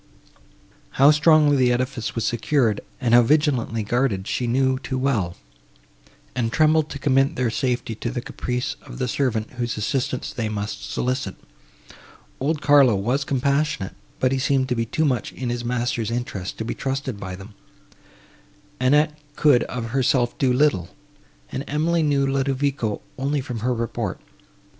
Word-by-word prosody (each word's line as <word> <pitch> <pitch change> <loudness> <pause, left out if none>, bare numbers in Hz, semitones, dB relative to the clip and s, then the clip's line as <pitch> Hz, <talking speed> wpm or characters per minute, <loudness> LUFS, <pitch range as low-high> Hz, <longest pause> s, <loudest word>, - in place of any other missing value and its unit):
How 140 +3 +7
strongly 150 -1 +5
the 125 -2 +3
edifice 125 -1 -2
was 115 - -1
secured, 120 -2 +1 0.2
and 120 -3 +1
how 120 - +8
vigilantly 125 -4 +1
guarded, 110 -3 0
she 125 - -1
knew 130 +2 +2
too 130 0 -4
well; 115 -10 0 1.0
and 115 -2 0
trembled 155 +2 +3
to 140 - -5
commit 135 0 +2
their 125 -2 0
safety 125 -2 -1
to 115 +2 -4
the 120 - -3
caprice 125 0 -3
of 130 -3 -11
the 130 -1 -1
servant, 115 -4 -1
whose 120 -2 -2
assistance 130 +3 -2
they 115 -3 -2
must 105 0 -4
solicit. 125 -6 -2 1.0
Old 150 +3 -1
Carlo 140 -5 +6
was 120 +8 0
compassionate, 140 -5 0 0.3
but 130 - +2
he 135 - 0
seemed 130 0 +1
to 125 - +1
be 115 -1 -1
too 155 +7 0
much 125 -6 -1
in 125 -2 -3
his 120 0 -3
master's 120 -2 -1
interest 115 -6 -4
to 110 - -4
be - - -2
trusted 135 -4 -3
by 95 -2 -6
them; 100 +3 -11 1.3
Annette 150 +4 +3 0.2
could 145 -5 +4
of 120 -2 -5
herself 125 -1 +1
do 130 -2 +3
little, 125 - +2 0.6
and 135 - -3
Emily 160 +3 +1
knew 145 -3 +2
Ludovico 135 -4 -1 0.2
only 140 +2 0
from 125 -4 -5
her 125 +3 0
report. 115 -1 -3
130 Hz, 155 wpm, -23 LUFS, 115-140 Hz, 1.3 s, how